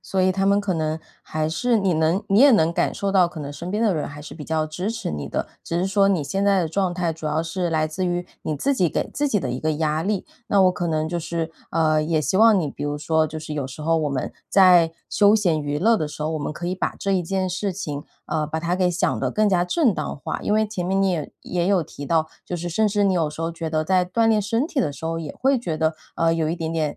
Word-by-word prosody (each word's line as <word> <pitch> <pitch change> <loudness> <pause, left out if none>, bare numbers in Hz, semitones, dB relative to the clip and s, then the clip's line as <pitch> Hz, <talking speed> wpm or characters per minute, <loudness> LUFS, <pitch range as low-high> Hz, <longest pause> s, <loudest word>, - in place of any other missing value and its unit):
所 190 - -2
以 185 0 +3
他 195 +1 0
们 200 0 +4
可 205 -2 -1
能 155 -1 -1 0.2
还 155 0 -2
是 235 +10 +1
你 195 -4 +1
能 160 +5 +1
你 195 +3 +4
也 285 +1 +8
能 165 -6 +4
感 - - 0
受 200 -1 -2
到 185 -3 +4
可 170 - -10
能 145 -1 -5
身 170 +5 -6
边 210 +3 0
的 220 -4 +3
人 155 -4 -2
还 145 +1 -9
是 150 - -9
比 155 - -8
较 155 0 0
支 180 +7 -3
持 230 - -4
你 75 -2 -4
的， - - -2 0.2
只 170 - -2
是 180 - +1
说 195 0 +3
你 180 -7 +1
现 195 +7 -2
在 200 -1 +3
的 165 - -1
状 185 +1 0
态 175 -2 -1
主 160 -1 -7
要 155 +1 0
是 175 +2 -2
来 155 -1 +1
自 180 +4 -3
于 175 0 -2 0.2
你 155 - -2
自 280 - +1
己 185 -9 +2
给 - - -2
自 290 0 0
己 215 - +2
的 130 -9 -3
一 125 - -3
个 155 0 0
压 155 0 0
力。 200 +1 -1 0.2
那 200 -1 +4
我 185 - +5
可 175 -1 -3
能 155 -1 0
就 175 +2 -2
是， 165 0 -3 0.2
呃， 155 -1 +2
也 160 +1 0
希 155 +5 0
望 220 -2 +6
你 165 - 0
比 - - -8
如 145 0 -2
说 160 +2 +1
就 155 +1 -6
是 155 0 -7
有 145 -3 -2
时 135 +3 -9
候 165 +2 +2
我 155 -2 0
们 135 -3 -3 0.2
在 180 -4 +6 0.2
休 205 +1 +5
闲 175 -7 +1
娱 145 0 -2
乐 225 +6 +3
的 155 - -2
时 150 0 -7
候， 155 - -1
我 160 - -2
们 145 - -3
可 170 +3 -6
以 180 - -1
把 185 - -2
这 195 - -1
一 185 - +2
件 190 +2 -1
事 185 +1 -2
情， 150 -6 -5 0.2
呃， 155 -1 -1
把 155 +1 -3
它 170 +2 -1
给 180 -1 +2
想 175 - 0
得 - - 0
更 215 0 +2
加 180 -3 +2
正 260 - +3
当 - - -4
化。 140 - -4
因 210 - 0
为 215 0 +3
前 205 -4 -4
面 195 +1 +1
你 195 - +3
也 160 -5 -3
也 175 -1 -1
有 190 -2 +3
提 145 -1 -9
到， 160 +1 +1 0.2
就 175 - -3
是 175 +1 -4
甚 215 +6 +2
至 205 0 +1
你 195 - +3
有 165 -4 +1
时 150 +2 -6
候 165 +1 -2
觉 165 0 -4
得 155 0 0
在 185 +1 +2
锻 225 +5 +1
炼 220 -1 +4
身 225 +7 0
体 305 -4 -1
的 190 - 0
时 145 +3 -9
候 165 0 -2
也 155 -3 -6
会 270 +1 +3
觉 170 -10 -3
得， 160 0 +1 0.2
呃， 165 0 +2
有 165 -1 0
一 165 - -2
点 165 -1 -3
点 155 -3 -1
170 Hz, 320 characters per minute, -23 LUFS, 155-195 Hz, 0.2 s, 也